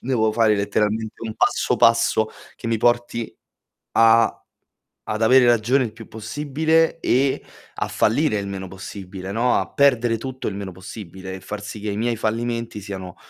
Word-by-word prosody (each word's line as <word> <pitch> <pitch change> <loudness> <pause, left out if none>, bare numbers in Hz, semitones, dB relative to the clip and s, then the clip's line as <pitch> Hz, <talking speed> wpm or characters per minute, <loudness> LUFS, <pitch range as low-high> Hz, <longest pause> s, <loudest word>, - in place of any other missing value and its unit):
Devo 110 -4 +1
fare 110 -2 +3
letteralmente 105 +2 -1
un 110 -1 -5
passo - - +1
passo 115 -1 +4 0.3
che - - -8
mi 115 -1 +1
porti 120 -1 0 0.6
a 115 0 +5 0.7
ad 110 +1 -2
avere 125 +2 +6
ragione 120 +3 +3
il 115 - -4
più 115 -1 -12
possibile 150 +8 0
e 135 +2 +1 0.3
a - - -2
fallire 115 +1 +2
il 100 - -5
meno 95 -1 -6
possibile, 95 0 -8
no, 120 +2 +2
a - - -4
perdere 120 -5 +3
tutto 130 +2 -5
il 100 - -3
meno 100 -1 -5
possibile, 95 0 -9
e 95 - -8
far 105 0 -6
sì 105 0 -7
che 105 - -3
i 100 - -3
miei 120 +2 0
fallimenti 115 0 -2
siano 95 -3 -7
110 Hz, 165 wpm, -22 LUFS, 100-120 Hz, 0.7 s, avere